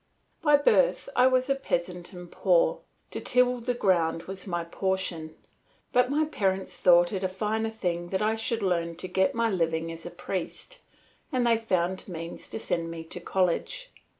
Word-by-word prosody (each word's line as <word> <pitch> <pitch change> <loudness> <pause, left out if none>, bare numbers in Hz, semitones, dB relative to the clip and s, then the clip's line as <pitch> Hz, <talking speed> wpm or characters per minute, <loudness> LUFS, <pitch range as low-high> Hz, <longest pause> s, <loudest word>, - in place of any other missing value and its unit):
By 295 -2 +6
birth - - +3
I 250 - +6
was 255 0 +2
a 275 - +3
peasant 180 -9 -3
and 180 -2 -10
poor; - - +2 0.3
to - - -3
till 250 0 +3
the 245 +1 -2
ground 170 -6 +1
was 190 +2 -6
my 175 -2 -1
portion; 170 -2 -2 0.6
but 250 0 +4
my 300 +3 +2
parents 190 -10 -1
thought 175 +1 +5
it 190 -1 -2
a - - +2
finer 215 +4 -1
thing 175 -5 -3
that 190 +2 0
I 215 +1 +2
should 225 0 -1
learn 170 -3 0
to 175 - -4
get 190 +3 +1
my 230 -1 +1
living 165 -2 0
as 165 0 -8
a - - -5
priest 185 - -5 0.5
and 255 -3 +1
they 235 -1 +5
found 185 -5 -1
means 165 -2 -7
to - - -4
send 165 -1 -2
me 165 -1 -6
to 165 +2 -5
college. 185 - -1
190 Hz, 180 wpm, -27 LUFS, 175-240 Hz, 0.6 s, By